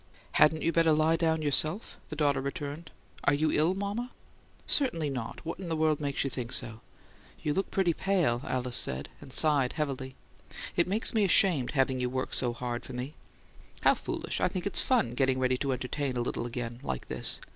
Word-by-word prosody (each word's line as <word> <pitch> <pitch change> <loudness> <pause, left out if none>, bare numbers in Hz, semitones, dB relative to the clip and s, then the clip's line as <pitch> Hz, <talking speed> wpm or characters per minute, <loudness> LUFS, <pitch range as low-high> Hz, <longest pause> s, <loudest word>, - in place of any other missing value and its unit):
"Hadn't 155 +1 +3
you 165 - +2
better 165 -1 +3
lie 155 +2 +3
down 160 -1 0
yourself?" 155 +7 +2
the 155 - -5
daughter 145 -3 +1
returned. 145 +2 -5 0.4
"Are 145 - +4
you 155 +1 +1
ill, 160 +5 +2
mama?" 205 +5 -3 0.6
"Certainly 165 - +4
not. 125 +3 -6
What 165 - -5
in 185 -3 -6
the 165 - -1
world 155 -1 +1
makes 140 -1 -1
you 135 - -2
think 125 -1 -5
so?" 110 -1 0 0.6
"You 150 - 0
look 195 +3 -1
pretty 185 -3 +1
pale," 170 -11 0
Alice 125 -2 0
said, 65 - -1
and - - -12
sighed 145 -3 +4
heavily. 135 -4 -4 0.6
"It 170 - +2
makes 210 +5 +2
me 220 -2 +2
ashamed, 175 -9 +3
having 135 -2 +1
you 125 0 -1
work 130 +1 -3
so 125 -2 0
hard 120 0 -5
for 130 - -9
me." 125 +4 -5 0.7
"How - - +5
foolish! - - -4
I - - +3
think - - -5
it's - - +5
fun, 120 - +1
getting 130 0 +1
ready 130 0 +1
to 140 +1 -2
entertain 130 +1 -3
a - - 0
little 120 0 -3
again, 120 0 -5
like 65 -1 -5
this. - - +1
145 Hz, 200 wpm, -29 LUFS, 125-165 Hz, 0.7 s, How